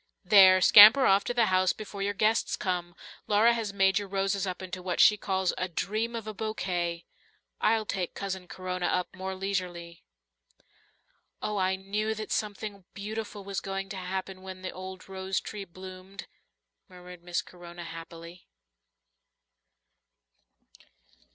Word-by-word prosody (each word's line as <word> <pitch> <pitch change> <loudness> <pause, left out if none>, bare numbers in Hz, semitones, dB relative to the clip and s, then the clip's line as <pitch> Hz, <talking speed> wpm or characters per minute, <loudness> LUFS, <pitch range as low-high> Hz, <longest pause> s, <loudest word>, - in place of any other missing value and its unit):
There, 185 -1 +7
scamper 220 +8 +9
off 195 +1 +4
to - - -2
the 235 -2 +4
house 185 0 +3
before 205 -2 -8
your 200 +1 -1
guests 215 +3 +1
come. 175 -2 -3 0.3
Laura 215 +3 +4
has 225 -3 -3
made 195 0 +3
your 205 - -6
roses 195 0 -1
up 185 - -4
into 185 0 -6
what 180 -1 -3
she 210 - +7
calls 190 -2 -1
'a 185 - -1
dream 215 +6 -2
of 225 -2 -5
a 215 - -5
bouquet,' 175 -5 -3 0.5
I'll 220 0 +2
take 185 -4 -3
Cousin 190 -2 -5
Corona 185 -1 -3
up 180 0 -1
more 190 0 -5
leisurely." 180 -3 -4 1.4
"Oh, 210 -1 -3
I 190 0 +1
knew 210 +3 -2
that 215 0 -6
something 205 -2 -3
beautiful 210 0 -6
was 195 0 -3
going 195 0 -4
to 195 - -6
happen 185 +1 -5
when 185 0 -9
the 185 - -4
old 185 0 -9
rose 190 0 -2
tree 205 -2 -7
bloomed," 185 +2 -10 0.6
murmured 180 -1 -12
Miss 175 0 -2
Corona 175 -1 -11
happily. 170 +1 -10
190 Hz, 145 wpm, -28 LUFS, 185-205 Hz, 1.4 s, scamper